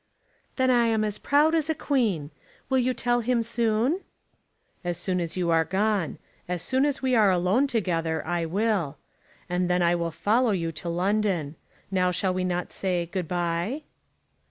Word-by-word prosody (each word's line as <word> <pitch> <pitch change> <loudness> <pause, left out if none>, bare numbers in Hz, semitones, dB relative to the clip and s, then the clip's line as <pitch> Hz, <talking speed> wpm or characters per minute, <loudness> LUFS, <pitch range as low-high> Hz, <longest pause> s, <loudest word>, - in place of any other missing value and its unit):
"Then 260 -1 +3
I 240 -2 +4
am 220 -1 +1
as 210 -1 -2
proud 295 +3 +3
as 320 -1 +1
a 320 - +1
queen. 210 - 0 0.4
You 260 -1 +4
will 255 - +2
tell 240 +1 +1
him 235 0 +1
soon?" 230 - +1 0.8
"As 175 -1 -2
soon 185 -2 -1
as 170 +1 -4
you 175 -2 +1
are 165 0 +4
gone. 190 0 0 0.3
As 180 -1 -3
soon 260 +7 +2
as 280 -2 -3
we 260 -1 +1
are 215 -4 +5
alone 185 +9 +2
together. 165 - -1
I 170 0 -1
will; 195 -4 0 0.5
and 180 0 0
then 180 0 +2
I 170 0 +3
will 170 -1 -1
follow 225 +9 +1
you 165 -3 -1
to 160 +2 -5
London. 180 -4 0 0.4
Now 185 -1 +2
shall 185 +1 0
we 185 0 -1
not 180 -1 -2
say, 180 -3 -1
Good 175 0 -4
bye?" 175 - -2
190 Hz, 180 wpm, -26 LUFS, 175-235 Hz, 0.8 s, are